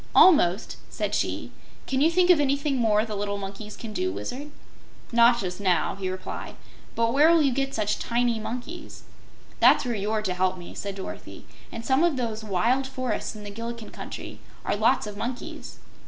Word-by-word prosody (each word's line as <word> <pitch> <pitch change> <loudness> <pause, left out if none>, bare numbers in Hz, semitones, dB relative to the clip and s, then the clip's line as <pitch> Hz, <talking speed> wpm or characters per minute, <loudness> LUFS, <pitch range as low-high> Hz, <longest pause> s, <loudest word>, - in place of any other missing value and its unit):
"Almost," 210 - +5
said - - -3
she. - - -1 0.3
"Can 265 0 0
you 315 - +6
think 360 +1 +4
of 340 - +5
anything 280 0 +1
more 220 -2 +3
the 215 -2 -5
little 205 0 -2
monkeys 200 +2 -7
can 225 -3 -7
do, 95 - -1
Wizard?" 245 - -5 0.6
"Not 235 0 +5
just 180 -2 -4
now," 185 -4 +2
he 190 -1 -4
replied. 185 +1 -6 0.4
"But 230 0 +1
where 295 +3 +6
will 335 -2 +5
you 275 - +3
get 275 +2 -1
such 210 -1 0
tiny 235 -1 +1
monkeys?" 250 +10 -7 0.6
"That's - - +6
where 245 - -1
you're 215 +1 -1
to 190 -3 -1
help 185 +1 0
me," 175 - -9
said 200 -1 -5
Dorothy. 190 - -8 0.3
"In 230 - -6
some 265 +6 +3
of 340 -5 +2
those 225 -3 -3
wild 230 +7 +1
forests 255 -5 -3
in 210 - -9
the 205 - -7
Gillikin 230 +1 -6
Country - - -8 0.3
are - - +1
lots - - +3
of 210 -1 -7
monkeys." 245 +3 -6
230 Hz, 185 wpm, -26 LUFS, 200-265 Hz, 0.6 s, you